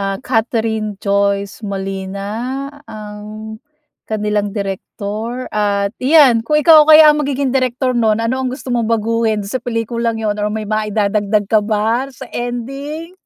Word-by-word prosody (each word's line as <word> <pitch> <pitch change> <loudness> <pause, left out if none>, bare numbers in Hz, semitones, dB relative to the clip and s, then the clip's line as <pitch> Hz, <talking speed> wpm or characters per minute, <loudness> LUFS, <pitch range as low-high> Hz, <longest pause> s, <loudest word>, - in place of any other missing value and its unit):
ah, 195 0 -1
Catherine 225 -3 -1
Joyce 200 0 0
Molina 200 +7 -4 0.2
ang 215 0 -8 0.5
kanilang 210 -1 -1
direktor 210 +5 -4
at 200 -1 0
iyan, 260 -5 +5
kung 300 +5 +2
ikaw 310 0 +7
kaya 310 0 +9
ang 300 - -1
magiging 275 -1 -1
direktor 255 0 0
'non, 220 -2 +2
ano 255 +3 -1
ang 260 - -1
gusto 260 0 -8
mong 235 -2 0
baguhin 225 -1 0
sa 255 +5 -2
pelikulang 230 0 -2
yun 210 -2 -1
or 210 - 0
may 215 0 -3
maidadagdag 210 -1 0
ka 215 -1 +4
ba 225 +5 0
sa 255 - -10
ending? 275 +7 -5
220 Hz, 140 wpm, -17 LUFS, 210-255 Hz, 0.5 s, kaya